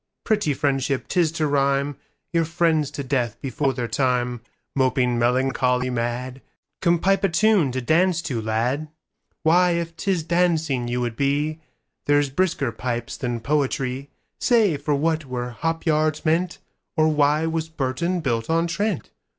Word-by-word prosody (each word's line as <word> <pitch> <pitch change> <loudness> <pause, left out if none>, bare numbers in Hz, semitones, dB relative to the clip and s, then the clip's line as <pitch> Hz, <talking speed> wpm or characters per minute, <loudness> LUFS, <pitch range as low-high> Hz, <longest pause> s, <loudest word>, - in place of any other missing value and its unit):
Pretty 205 - +1
friendship 135 -1 0
'tis 175 -4 +2
to 165 - -2
rhymeYour 140 +3 -1
friends 160 -3 +1
to 140 - -5
death 125 -4 -1
before 135 +1 -1
their 125 -2 -3
timeMoping 125 0 -1
melancholy 125 +1 +1
mad:Come, 125 +8 -2
pipe 195 +4 +1
a 195 - +3
tune 195 -5 +3
to 130 +1 -2
dance 170 +5 +2
to, 130 -9 -2
lad.'Why, 155 +8 -1
if 170 -1 -3
'tis 180 -1 -1
dancing 160 -7 +1
you 125 +1 -1
would 120 -2 -2
be, 145 +4 0 0.5
There's 145 -1 +3
brisker 145 -6 0
pipes 120 -1 -4
than 120 -3 -3
poetry. 135 0 -1 0.3
Say, 225 - +3
for 145 +1 -1
what 155 +2 0
were 125 -1 -4
hop 165 +8 -3
yards 155 0 +1
meant, 170 +3 +1 0.4
Or 155 0 +4
why 150 0 +2
was 160 0 -2
Burton 160 +4 -1
built 115 -6 -1
on 165 +1 +2
Trent? 180 +2 -2
145 Hz, 140 wpm, -23 LUFS, 125-165 Hz, 0.5 s, Or